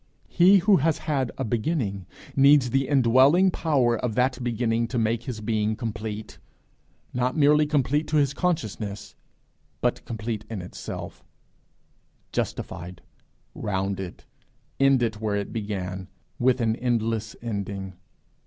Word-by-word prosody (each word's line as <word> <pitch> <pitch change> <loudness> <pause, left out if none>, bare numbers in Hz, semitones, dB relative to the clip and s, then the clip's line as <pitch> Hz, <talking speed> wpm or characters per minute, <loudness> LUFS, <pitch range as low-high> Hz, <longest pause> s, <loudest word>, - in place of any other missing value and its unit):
He 185 +3 +6
who 195 +1 +4
has 155 +2 +1
had 135 -6 -1
a - - -2
beginning, 110 - -1 0.3
needs 140 -2 +5
the 135 +1 +1
indwelling 140 +7 +5
power 135 -9 +2
of 115 -4 -2
that 125 +1 +1
beginning 115 -1 0
to 125 - -3
make 115 0 +1
his 115 -4 -5
being 110 0 0
complete 110 -2 -5 0.7
not 125 +3 0
merely 150 0 +5
complete 145 +1 +1
to 155 - +1
his 140 -2 +2
consciousness, 110 - -3 0.7
but - - 0
complete 110 -1 -4
in 110 -3 -4
itself 90 - -8 1.1
justified, 90 +1 -4 0.5
rounded, 95 -2 -3 0.6
ended 130 -5 +3
where 105 -1 -1
it 100 -1 -3
began 95 -4 -4 0.3
with 125 0 +3
an 110 -1 +1
'endless 115 -3 -1
ending.' 100 -4 -4
115 Hz, 125 wpm, -25 LUFS, 105-135 Hz, 1.1 s, He